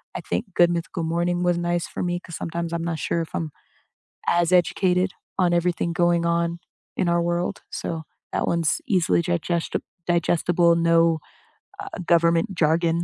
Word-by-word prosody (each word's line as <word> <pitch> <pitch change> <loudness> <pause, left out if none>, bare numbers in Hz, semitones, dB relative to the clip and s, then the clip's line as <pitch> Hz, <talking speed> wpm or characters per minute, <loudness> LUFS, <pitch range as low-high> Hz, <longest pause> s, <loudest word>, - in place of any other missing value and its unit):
I - - -3
think - - -2
Good 175 0 +6
Mythical 170 0 -3
Morning 175 +2 0
was 175 -1 +2
nice 175 -1 -1
for - - -5
me 175 0 -1
'cause 170 -2 -9
sometimes 170 0 -4
I'm 170 0 -2
not 165 -2 -2
sure 170 - -1
if 165 - -7
I'm 160 -2 -3 0.8
as 175 0 +2
educated 180 +1 +2 0.3
on 180 -2 +3
everything 170 -1 +1
going 175 0 +2
on 170 0 0 0.4
in 180 - +1
our 170 0 +2
world. 175 +1 -1
So, 160 -1 -4 0.3
that - - 0
one's 170 -2 +1
easily 180 -3 +2
gigesta 170 -1 -1 0.3
digestible, 170 0 +3
no, 165 -1 +3 0.6
uh, - - -6 0.2
government 170 +3 +3
jargon, 165 +1 +2
170 Hz, 160 wpm, -24 LUFS, 170-175 Hz, 0.8 s, Good